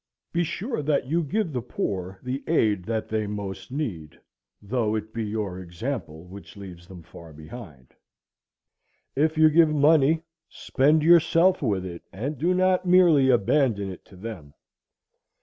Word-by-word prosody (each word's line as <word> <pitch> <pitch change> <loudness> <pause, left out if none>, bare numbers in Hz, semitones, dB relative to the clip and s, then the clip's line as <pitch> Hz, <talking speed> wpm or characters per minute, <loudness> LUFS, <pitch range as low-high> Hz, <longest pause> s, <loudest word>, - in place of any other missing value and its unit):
Be 175 0 +1
sure 205 - -3
that 145 -2 0
you 165 +6 0
give 170 +2 -2
the 125 - -2
poor 95 -4 -4
the 130 +2 -4
aid 105 - +1
they 110 -1 -2
most 100 +1 -6
need, 95 - -5 0.4
though 110 0 -1
it 110 0 -5
be 115 - -3
your 105 -4 -4
example 90 - -6
which 95 +3 -13
leaves 90 -3 -11
them 90 -3 -12
far 85 0 -13
behind. 80 - -12 1.2
If 155 +3 +1
you 155 0 +6
give 165 0 +5
money, 155 +1 +3 0.3
spend 150 +3 +1
yourself 170 +2 +4
with 100 -8 -1
it, 85 -2 -7
and 130 +7 -5
do 175 +5 +1
not 185 0 +2
merely 175 -7 +5
abandon 115 -4 +2
it 90 - -11
to 100 - -17
them. 90 -8 -9
115 Hz, 150 wpm, -25 LUFS, 95-155 Hz, 1.2 s, you